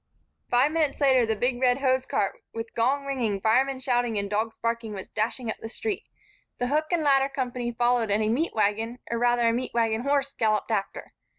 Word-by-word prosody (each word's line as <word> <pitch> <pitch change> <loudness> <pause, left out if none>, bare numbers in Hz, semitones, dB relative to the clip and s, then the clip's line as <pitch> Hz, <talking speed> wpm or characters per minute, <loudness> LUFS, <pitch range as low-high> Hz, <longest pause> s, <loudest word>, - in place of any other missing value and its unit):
Five 255 +5 +3
minutes 315 -3 0
later, 260 -5 +4
the 220 - +1
big 245 +3 -1
red 250 -1 +4
hosecart, 260 - 0
with 225 0 -5
gong 270 +5 +1
ringing, 240 -8 -1
firemen 260 +6 +2
shouting 245 -3 0
and 200 0 -1
dogs 220 +2 -1
barking, 230 -1 -2
was 190 - -7
dashing 230 +3 -2
up - - -7
the 225 - -7
street. 425 - -3 0.5
The 245 - -1
hook 305 +2 +1
and 340 -3 +1
ladder 275 -1 +4
company 250 -3 -3
followed 240 -1 +1
and 205 +2 +2
a 215 - +1
meat 285 +9 0
wagon, 220 +3 0
or 235 - -1
rather 240 0 +3
a 230 - +3
meat 245 0 -3
wagon 225 -1 +1
horse, 280 +1 0
galloped 215 0 0
after. 200 -3 -3
245 Hz, 200 wpm, -26 LUFS, 225-270 Hz, 0.5 s, later